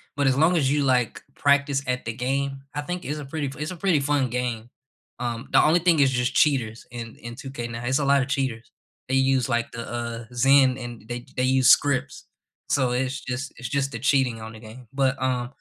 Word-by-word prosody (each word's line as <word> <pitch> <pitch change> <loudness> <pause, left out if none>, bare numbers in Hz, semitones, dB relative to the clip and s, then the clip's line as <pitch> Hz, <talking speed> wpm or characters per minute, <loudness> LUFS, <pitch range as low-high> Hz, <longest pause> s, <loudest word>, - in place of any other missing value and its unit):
but 140 -1 +1
as 130 0 +3
long 160 +4 +4
as 140 -5 +2
you, 145 0 +2
like, 125 -4 +1
practice 140 -1 +2
at 125 -2 -2
the 115 - -3
game, 135 +2 -2
I 145 - -1
think 180 +4 -5
it's 150 +2 -3
a 145 - -7
pretty 145 +1 -3
f 135 - -7
it's 150 +3 -3
a - - -6
pretty 175 -3 +2
fun 140 -2 +1
game. 120 -2 -3 0.5
Um, 120 -1 -3
the - - +6
only 160 +3 +4
thing 170 -2 +3
is 135 -1 +4
just 125 0 0
cheaters 120 -7 +2
in 115 -2 -7
in 120 0 -8
2K 130 -3 -6
now, 115 +1 -6
it's 130 +3 +2
a 140 - 0
lotta 140 -1 +3
cheaters. 130 -5 -2 0.4
They 130 - +1
use, 135 -1 +2
like 120 -1 0
the, 115 - -6
uh, 120 -1 -4
Zen 130 +1 +4
and 120 -3 -8
they 120 0 -5
they 125 - +1
use 130 0 +4
scripts. 140 -2 +3 0.4
So 130 -3 +2
it's 130 +2 -1
just 130 +2 -5
it's 120 - -5
just 140 +1 0
the 115 - -5
cheating 130 -3 +2
on 110 0 -8
the 110 - -11
game. 115 +2 -12
But, 135 -1 +2
uh, 125 -2 0
130 Hz, 225 wpm, -24 LUFS, 120-140 Hz, 0.5 s, the